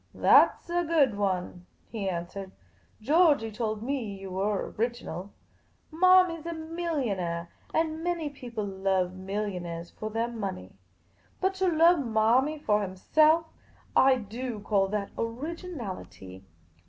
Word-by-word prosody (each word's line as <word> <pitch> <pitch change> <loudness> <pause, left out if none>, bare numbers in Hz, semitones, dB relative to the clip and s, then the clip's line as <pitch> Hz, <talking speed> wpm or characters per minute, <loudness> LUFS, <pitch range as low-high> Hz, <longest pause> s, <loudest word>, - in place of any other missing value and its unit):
" - - -39
That - - +5
's - - -11
a 350 0 +1
good 305 -9 +3
one," 180 -3 -2 0.2
he 205 -4 -2
answered. 180 +2 -5 0.3
" - - -35
Georgey 290 -5 +4
told 215 -1 -3
me 275 +2 -1 0.2
you 195 -1 -8
were 195 +2 -1
original. 215 -5 -3 0.6
Marmy 365 0 +5
's 330 - -9
a 335 - -3
millionaire, 265 - -3 0.2
and 320 0 -1
many 345 -3 -1
people 245 -6 -6
love 190 -2 0
millionaires 185 -3 -4
for 215 - -6
their 225 +2 -1
money. 195 - -5 0.7
But 380 0 +1
to 380 - +3
love 335 0 +5
Marmy 245 +5 +2
for 210 -7 +1
himself 305 - +3 0.3
— - - -31
I 265 - +5
do 235 0 -5
call 200 -2 +2
that 200 0 -3
originality 230 - -6
225 Hz, 140 wpm, -28 LUFS, 195-310 Hz, 0.7 s, That